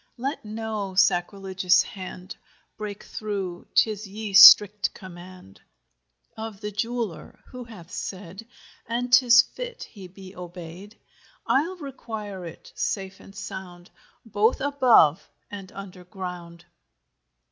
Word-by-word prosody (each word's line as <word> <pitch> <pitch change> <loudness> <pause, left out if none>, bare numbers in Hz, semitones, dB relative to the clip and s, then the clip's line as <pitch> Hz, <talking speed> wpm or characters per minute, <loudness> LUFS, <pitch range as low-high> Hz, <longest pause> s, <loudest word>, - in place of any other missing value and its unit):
Let 270 +4 -4
no 215 -3 -5
sacrilegious 190 0 +2
hand 185 -1 -9 0.4
Breake 210 -1 -7
through—'tis 205 +1 -2
y^e 210 +1 -6
strickte 205 0 +9
comaund 180 - -13 0.8
Of 220 -2 -7
the 210 0 -5
jeweller: 225 -3 -4
who 250 -1 -9
hath 195 -8 -13
sayd 190 +3 -7 0.4
(And 245 +1 -3
'tis 240 -1 +7
fit - - -8
he 195 -5 -12
be 190 +1 -13
obey'd) 180 +3 -10 0.5
I'll 330 +8 +1
require 220 - -7
it 165 - -12
safe 195 -1 -3
and 195 - -15
sound 185 -4 -9 0.3
Both 220 +2 +1
above 250 - +4 0.2
and 200 -1 -9
under 190 -2 -10
ground. 180 -3 -8
200 Hz, 110 wpm, -25 LUFS, 185-225 Hz, 0.8 s, strickte